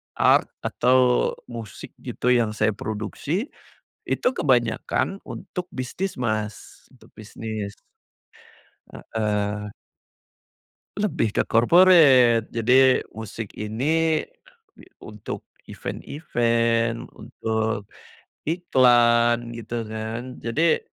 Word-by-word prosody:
art, -, -, +4 dB, 0.2 s
atau 125 Hz, 0 st, +3 dB, 0.2 s
musik 115 Hz, -4 st, -8 dB
gitu 125 Hz, -, -1 dB
yang 115 Hz, -3 st, +2 dB
saya 110 Hz, 0 st, +2 dB
produksi, 110 Hz, -, -4 dB, 0.5 s
itu -, -, 0 dB
kebanyakan 130 Hz, -, 0 dB
untuk 180 Hz, -1 st, -7 dB
bisnis, 130 Hz, +5 st, -4 dB
Mas, 110 Hz, -3 st, -4 dB
untuk -, -, -20 dB
bisnis. 110 Hz, -1 st, -6 dB, 1.4 s
Heeh. 105 Hz, -1 st, -1 dB, 1.3 s
Lebih 185 Hz, -, 0 dB
ke -, -, +1 dB
corporate, 130 Hz, -, +5 dB
jadi 130 Hz, +3 st, +4 dB, 0.2 s
musik 110 Hz, -1 st, -7 dB
ini 155 Hz, +9 st, 0 dB, 0.7 s
untuk 105 Hz, -1 st, -8 dB, 0.2 s
event-event, 115 Hz, -5 st, -1 dB
untuk 110 Hz, -2 st, -3 dB, 0.6 s
iklan, 120 Hz, -7 st, +3 dB
gitu 115 Hz, 0 st, -5 dB
kan. 115 Hz, +3 st, -6 dB
Jadi 155 Hz, +8 st, +1 dB
120 Hz, 80 wpm, -24 LUFS, 110-130 Hz, 1.4 s, corporate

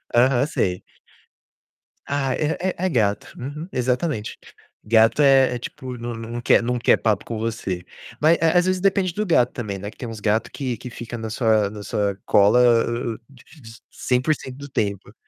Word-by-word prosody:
Aham, 125 Hz, +2 st, +4 dB
sei. 90 Hz, -10 st, -1 dB, 1.2 s
Ah, 140 Hz, -2 st, -1 dB
é 155 Hz, +1 st, -1 dB
é 185 Hz, 0 st, -1 dB
é -, -, +2 dB
gato. 105 Hz, -7 st, 0 dB
Uhum, 150 Hz, +6 st, -6 dB
exatamente. 125 Hz, -1 st, -1 dB, 0.5 s
Gato 115 Hz, +5 st, +4 dB
é 135 Hz, -3 st, +5 dB
é 120 Hz, -, -4 dB
tipo 125 Hz, +1 st, -7 dB
nã 120 Hz, 0 st, -5 dB
na 115 Hz, 0 st, -7 dB
não 120 Hz, +1 st, -5 dB
quer -, -, +4 dB
não 125 Hz, +1 st, -1 dB
quer 120 Hz, -, +3 dB
papo 110 Hz, -4 st, 0 dB
com 115 Hz, -, -5 dB
você. 110 Hz, -5 st, -3 dB, 0.4 s
Mas, 160 Hz, +2 st, +5 dB
eh, 165 Hz, +2 st, +3 dB
às 175 Hz, -, +4 dB
vezes, 185 Hz, -1 st, 0 dB
depende 195 Hz, -2 st, +1 dB
do 210 Hz, +4 st, -2 dB
gato 125 Hz, -, +2 dB
também, 105 Hz, -5 st, -4 dB
né? 100 Hz, -, -6 dB
Que -, -, -16 dB
tem 120 Hz, -, -6 dB
uns 110 Hz, -, -7 dB
gato 105 Hz, +1 st, 0 dB
que 130 Hz, -4 st, -3 dB
que 125 Hz, -, -8 dB
fica 120 Hz, 0 st, -7 dB
na 110 Hz, 0 st, -5 dB
sua 110 Hz, -3 st, +2 dB
na 105 Hz, 0 st, -9 dB
sua 100 Hz, -1 st, -1 dB
cola 105 Hz, +5 st, +5 dB
hã 120 Hz, -1 st, +2 dB
hã -, -, -9 dB
di 130 Hz, -3 st, -18 dB, 0.2 s
di 115 Hz, -, -12 dB, 0.2 s
100% 130 Hz, 0 st, -1 dB
do 140 Hz, 0 st, -9 dB
tempo. 100 Hz, -4 st, -3 dB
120 Hz, 195 wpm, -22 LUFS, 110-140 Hz, 1.2 s, é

